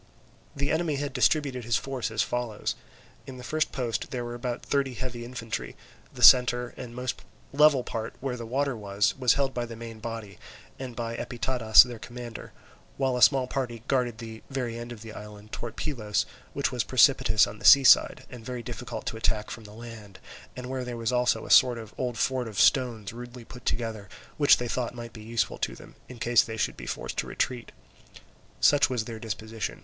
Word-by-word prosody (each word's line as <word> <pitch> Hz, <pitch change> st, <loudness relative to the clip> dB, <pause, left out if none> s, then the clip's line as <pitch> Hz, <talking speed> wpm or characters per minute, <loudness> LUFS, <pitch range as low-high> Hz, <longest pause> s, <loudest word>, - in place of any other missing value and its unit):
The 140 Hz, 0 st, -1 dB
enemy 160 Hz, -2 st, 0 dB
had 140 Hz, -1 st, -3 dB
distributed 135 Hz, -1 st, +1 dB
his 115 Hz, +1 st, +1 dB
force 130 Hz, -3 st, -3 dB
as 110 Hz, 0 st, +1 dB
follows: 120 Hz, -4 st, -2 dB, 0.5 s
In 130 Hz, -1 st, -8 dB
this 125 Hz, -, -9 dB
first 155 Hz, +3 st, 0 dB
post 115 Hz, -4 st, -3 dB
there 125 Hz, -3 st, -4 dB
were 120 Hz, -, -5 dB
about 120 Hz, 0 st, -4 dB
thirty 135 Hz, -3 st, 0 dB
heavy 120 Hz, -1 st, -5 dB
infantry; 115 Hz, -2 st, -5 dB, 0.4 s
the -, -, -6 dB
centre 125 Hz, -1 st, +7 dB
and 120 Hz, -1 st, -8 dB
most 125 Hz, 0 st, -3 dB, 0.3 s
level 145 Hz, -3 st, +5 dB
part, 115 Hz, -1 st, -5 dB
where 135 Hz, -2 st, -3 dB
the 115 Hz, -2 st, -7 dB
water 135 Hz, +2 st, 0 dB
was, 100 Hz, -1 st, 0 dB
was 125 Hz, -3 st, +4 dB
held 135 Hz, -1 st, 0 dB
by 120 Hz, -1 st, -3 dB
the 115 Hz, -, -8 dB
main 115 Hz, -1 st, -9 dB
body, 115 Hz, -3 st, -7 dB, 0.4 s
and 130 Hz, -3 st, -6 dB
by 115 Hz, -1 st, -3 dB
Epitadas 120 Hz, -3 st, +5 dB
their 120 Hz, -2 st, -8 dB
commander; 120 Hz, -1 st, -8 dB, 0.5 s
while 135 Hz, -2 st, +1 dB
a 125 Hz, -, -2 dB
small 135 Hz, -1 st, +6 dB
party 125 Hz, -4 st, -4 dB
guarded 125 Hz, -4 st, 0 dB
the 110 Hz, 0 st, -9 dB
very 125 Hz, -4 st, -3 dB
end 120 Hz, +1 st, -7 dB
of 115 Hz, -2 st, -9 dB
the 110 Hz, -1 st, -9 dB
island, 105 Hz, 0 st, -11 dB
towards 120 Hz, -1 st, -6 dB
Pylos, 105 Hz, -9 st, -1 dB, 0.3 s
which -, -, 0 dB
was -, -, 0 dB
precipitous 110 Hz, -1 st, +4 dB
on 105 Hz, -, -9 dB
the -, -, -13 dB
sea 140 Hz, +6 st, +9 dB
side 125 Hz, -, +5 dB
and 120 Hz, -2 st, -10 dB
very 125 Hz, 0 st, -5 dB
difficult 115 Hz, -3 st, -6 dB
to 110 Hz, -, -3 dB
attack 110 Hz, -1 st, -1 dB
from 115 Hz, -, -8 dB
the 105 Hz, -, -11 dB
land, 110 Hz, -4 st, -10 dB, 0.4 s
and 125 Hz, -, -7 dB
where 130 Hz, 0 st, -3 dB
there 125 Hz, -1 st, -5 dB
was 115 Hz, +1 st, -1 dB
also 125 Hz, 0 st, +1 dB
a -, -, -5 dB
sort 125 Hz, -2 st, +6 dB
of 110 Hz, -2 st, -9 dB
old 125 Hz, -2 st, -2 dB
fort 130 Hz, -2 st, 0 dB
of 105 Hz, -3 st, -5 dB
stones 120 Hz, -5 st, +2 dB
rudely 120 Hz, 0 st, -9 dB
put 125 Hz, +2 st, -12 dB
together, 110 Hz, -4 st, -2 dB, 0.3 s
which 145 Hz, -2 st, +6 dB
they 120 Hz, -, -3 dB
thought 125 Hz, 0 st, -2 dB
might 120 Hz, -1 st, -8 dB
be 110 Hz, -, -10 dB
useful 115 Hz, +1 st, -2 dB
to -, -, -2 dB
them, -, -, -14 dB, 0.2 s
in 125 Hz, -, -9 dB
case 120 Hz, 0 st, +4 dB
they 110 Hz, -1 st, -6 dB
should 110 Hz, -, -1 dB
be -, -, -9 dB
forced -, -, -5 dB
to -, -, -2 dB
retreat. 125 Hz, -2 st, -2 dB, 0.9 s
Such 145 Hz, -, +5 dB
was 120 Hz, -4 st, -1 dB
their 115 Hz, -1 st, -7 dB
disposition. 110 Hz, 0 st, -5 dB
120 Hz, 205 wpm, -27 LUFS, 115-125 Hz, 0.9 s, sea